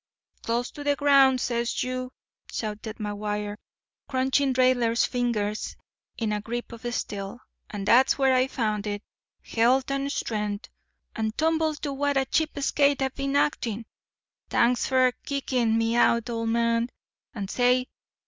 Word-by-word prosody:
"Close 235 Hz, +2 st, -1 dB
to 290 Hz, -, -8 dB
the 290 Hz, 0 st, +2 dB
ground, 275 Hz, -2 st, +5 dB
says 235 Hz, -1 st, -1 dB
you," 255 Hz, 0 st, -4 dB, 0.4 s
shouted 215 Hz, 0 st, -4 dB
McGuire, 210 Hz, -1 st, -3 dB, 0.5 s
crunching 265 Hz, +1 st, +2 dB
Raidler's 250 Hz, -2 st, +3 dB
fingers 220 Hz, -4 st, -1 dB, 0.4 s
in 220 Hz, -2 st, -1 dB
a 210 Hz, -, -2 dB
grip 240 Hz, +3 st, -5 dB
of 235 Hz, +1 st, -5 dB
steel; 200 Hz, -1 st, -4 dB, 0.3 s
"and 205 Hz, -2 st, -5 dB
dat's 250 Hz, +5 st, +5 dB
where 270 Hz, -2 st, +4 dB
I 255 Hz, 0 st, +3 dB
found 215 Hz, -5 st, -2 dB
it—healt' 235 Hz, +5 st, -1 dB
and 275 Hz, 0 st, -1 dB
strengt', 210 Hz, -3 st, -3 dB, 0.4 s
and 220 Hz, 0 st, -2 dB
tumbled 315 Hz, -1 st, +1 dB
to 285 Hz, -, -2 dB
what 285 Hz, 0 st, 0 dB
a 265 Hz, -, +2 dB
cheap 315 Hz, +2 st, 0 dB
skate 280 Hz, 0 st, +2 dB
I 265 Hz, -, +1 dB
been 275 Hz, +1 st, -3 dB
actin'. 230 Hz, -6 st, 0 dB, 0.6 s
T'anks 240 Hz, +1 st, +2 dB
fer 255 Hz, -1 st, +4 dB
kickin' 250 Hz, -5 st, 0 dB
me 225 Hz, +1 st, +1 dB
out, 235 Hz, 0 st, +3 dB
old 230 Hz, -1 st, -2 dB
man. 230 Hz, +1 st, +1 dB, 0.5 s
And—say! 245 Hz, +5 st, +1 dB
240 Hz, 140 wpm, -26 LUFS, 220-265 Hz, 0.6 s, ground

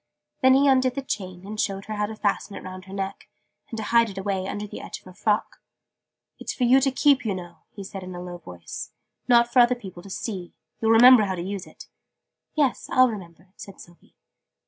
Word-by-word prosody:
Then 260 Hz, 0 st, +6 dB
he 280 Hz, +1 st, +4 dB
undid 260 Hz, -2 st, +3 dB
the 275 Hz, -, -3 dB
chain, 185 Hz, -7 st, -5 dB
and 215 Hz, +1 st, -3 dB
showed 195 Hz, -1 st, -2 dB
her 215 Hz, -, -5 dB
how 210 Hz, 0 st, -1 dB
to 220 Hz, -, -7 dB
fasten 205 Hz, -1 st, -1 dB
it -, -, -8 dB
round 185 Hz, 0 st, -8 dB
her 190 Hz, -, -13 dB
neck, 195 Hz, 0 st, -5 dB, 0.4 s
and 225 Hz, -, -6 dB
to 220 Hz, -, -3 dB
hide 230 Hz, +1 st, +3 dB
it 195 Hz, -, -10 dB
away 190 Hz, -1 st, -2 dB
under 205 Hz, +1 st, -4 dB
the 205 Hz, -, -8 dB
edge -, -, -7 dB
of -, -, -22 dB
her 185 Hz, -, -12 dB
frock. 210 Hz, +3 st, 0 dB, 0.8 s
"It's -, -, -5 dB
for 255 Hz, -, -1 dB
you 255 Hz, +2 st, +5 dB
to 270 Hz, -, +3 dB
keep 275 Hz, 0 st, +3 dB
you 210 Hz, -4 st, -1 dB
know 175 Hz, -2 st, -9 dB
he 200 Hz, -, -9 dB
said 195 Hz, 0 st, -7 dB
in 185 Hz, -1 st, -8 dB
a -, -, -6 dB
low 175 Hz, 0 st, -7 dB
voice, 90 Hz, -, -8 dB, 0.3 s
not 240 Hz, -1 st, +4 dB
for 255 Hz, -, +5 dB
other 245 Hz, +1 st, +6 dB
people 190 Hz, -7 st, -10 dB
to 195 Hz, -, -12 dB
see. 190 Hz, -2 st, -5 dB, 0.3 s
You'll 225 Hz, -, +1 dB
remember 230 Hz, 0 st, +8 dB
how 190 Hz, -1 st, -2 dB
to 170 Hz, -, -4 dB
use 195 Hz, 0 st, -5 dB
it?" -, -, -13 dB, 0.7 s
"Yes, 290 Hz, -4 st, 0 dB
I'll 255 Hz, 0 st, +5 dB
remember," 180 Hz, -4 st, -9 dB
said 195 Hz, -, -11 dB
Sylvie. 175 Hz, 0 st, -17 dB
205 Hz, 230 wpm, -25 LUFS, 185-240 Hz, 0.8 s, remember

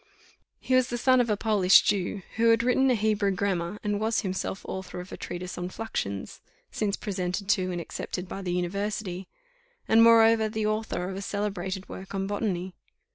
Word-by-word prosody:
He 260 Hz, -, -2 dB
was 255 Hz, -1 st, +4 dB
the 240 Hz, -, -3 dB
son 255 Hz, +1 st, +4 dB
of 235 Hz, -, -1 dB
a 210 Hz, -, +1 dB
Polish 200 Hz, -4 st, +5 dB
Jew, 200 Hz, -1 st, -1 dB
who 230 Hz, 0 st, +4 dB
had 230 Hz, 0 st, +4 dB
written 255 Hz, +2 st, +3 dB
a 250 Hz, -, +4 dB
Hebrew 215 Hz, -2 st, +1 dB
grammar, 190 Hz, -1 st, -1 dB
and 205 Hz, -1 st, 0 dB
was 220 Hz, +1 st, +1 dB
himself 190 Hz, -1 st, -4 dB
author 190 Hz, -1 st, -6 dB
of 180 Hz, +1 st, -9 dB
a -, -, -5 dB
treatise 180 Hz, 0 st, -6 dB
on 180 Hz, 0 st, -3 dB
fluxions 100 Hz, -, -4 dB, 0.3 s
(since 205 Hz, -2 st, -1 dB
presented 190 Hz, -1 st, -3 dB
to, 185 Hz, -3 st, +2 dB
and 175 Hz, -, -3 dB
accepted 180 Hz, +2 st, -5 dB
by 195 Hz, -, -6 dB
the 180 Hz, -2 st, -3 dB
university), 190 Hz, +1 st, -3 dB, 0.6 s
and 225 Hz, +1 st, +6 dB
moreover 225 Hz, -1 st, +6 dB
the 215 Hz, 0 st, -2 dB
author 215 Hz, -4 st, -1 dB
of 190 Hz, -, -5 dB
a -, -, -4 dB
celebrated 195 Hz, -2 st, -3 dB
work 190 Hz, +1 st, -8 dB
on 195 Hz, 0 st, -1 dB
botany. 195 Hz, -3 st, -2 dB
200 Hz, 185 wpm, -27 LUFS, 185-220 Hz, 0.6 s, and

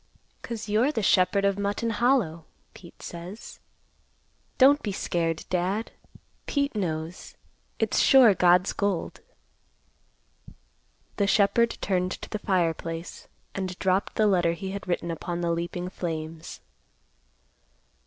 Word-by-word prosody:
"'Cause 225 Hz, -2 st, -6 dB
you're 220 Hz, +7 st, +2 dB
the 225 Hz, -8 st, -2 dB
Shepherd 190 Hz, +1 st, +3 dB
of 200 Hz, 0 st, +1 dB
Mutton 205 Hz, +3 st, -1 dB
Hollow, 220 Hz, -, +1 dB, 0.3 s
Pete 170 Hz, -, -15 dB
says. 175 Hz, +5 st, -9 dB, 1.0 s
Don't 280 Hz, +2 st, +6 dB
be 205 Hz, -, -3 dB
scared, 165 Hz, -3 st, -2 dB
Dad. 185 Hz, +5 st, -1 dB, 0.6 s
Pete 280 Hz, -1 st, 0 dB
knows. 165 Hz, -3 st, -4 dB, 0.4 s
It's -, -, +1 dB
sure 255 Hz, -6 st, +7 dB
God's 180 Hz, +1 st, +3 dB
gold." 200 Hz, -4 st, -2 dB, 2.0 s
The 200 Hz, -, +2 dB
shepherd 220 Hz, +4 st, +3 dB
turned 185 Hz, -1 st, 0 dB
to -, -, -9 dB
the 215 Hz, -, -3 dB
fireplace 165 Hz, -3 st, -2 dB, 0.3 s
and 185 Hz, -2 st, -4 dB
dropped 190 Hz, +1 st, 0 dB
the 215 Hz, -, +3 dB
letter 175 Hz, -5 st, +3 dB
he 190 Hz, +2 st, -6 dB
had 200 Hz, 0 st, -6 dB
written 175 Hz, -1 st, -1 dB
upon 175 Hz, +1 st, -4 dB
the 170 Hz, -1 st, 0 dB
leaping 175 Hz, +1 st, -3 dB
flames. 165 Hz, -3 st, -6 dB
185 Hz, 120 wpm, -26 LUFS, 170-210 Hz, 2.0 s, sure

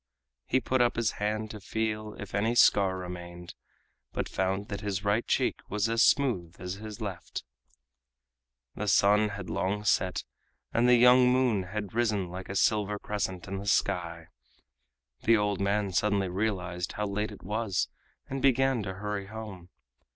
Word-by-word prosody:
He 130 Hz, -, +3 dB
put 130 Hz, 0 st, +1 dB
up 120 Hz, -, +3 dB
his 115 Hz, -2 st, +1 dB
hand 110 Hz, +1 st, -1 dB
to 105 Hz, -, -8 dB
feel 110 Hz, +1 st, -3 dB
if 105 Hz, -, -8 dB
any 110 Hz, +4 st, +1 dB
scar 100 Hz, -5 st, +5 dB
remained, 90 Hz, -1 st, -8 dB, 0.6 s
but -, -, -2 dB
found 95 Hz, +2 st, -1 dB
that 100 Hz, -1 st, -4 dB
his 100 Hz, -2 st, -2 dB
right 105 Hz, +3 st, +2 dB
cheek -, -, +1 dB
was 105 Hz, +2 st, 0 dB
as 115 Hz, 0 st, +1 dB
smooth 105 Hz, -, +2 dB
as 90 Hz, 0 st, -4 dB
his 110 Hz, +1 st, -8 dB
left. 95 Hz, -5 st, -5 dB, 1.3 s
The 105 Hz, -, -4 dB
sun 105 Hz, +2 st, +4 dB
had 100 Hz, -3 st, -6 dB
long 105 Hz, +2 st, -1 dB
set, 95 Hz, -3 st, +1 dB, 0.5 s
and 120 Hz, +1 st, +3 dB
the 125 Hz, -, +7 dB
young 125 Hz, +1 st, +6 dB
moon 125 Hz, -7 st, +2 dB
had 100 Hz, +1 st, -5 dB
risen 110 Hz, -6 st, 0 dB
like 90 Hz, +1 st, -7 dB
a 95 Hz, -, -4 dB
silver 105 Hz, 0 st, +2 dB
crescent 95 Hz, -4 st, -3 dB
in 95 Hz, 0 st, -4 dB
the 100 Hz, -, -7 dB
sky. 85 Hz, -4 st, 0 dB, 1.0 s
The 115 Hz, 0 st, +6 dB
old 105 Hz, -2 st, 0 dB
man 100 Hz, 0 st, +1 dB
suddenly 100 Hz, 0 st, +1 dB
realized 90 Hz, -2 st, -2 dB
how 105 Hz, -, -2 dB
late 105 Hz, +2 st, -2 dB
it 100 Hz, -, -12 dB
was 105 Hz, 0 st, -1 dB, 0.4 s
and 135 Hz, 0 st, -4 dB
began 135 Hz, -2 st, +3 dB
to 95 Hz, -2 st, -5 dB
hurry 105 Hz, 0 st, -4 dB
home. 100 Hz, -5 st, -8 dB
105 Hz, 165 wpm, -29 LUFS, 95-110 Hz, 1.3 s, the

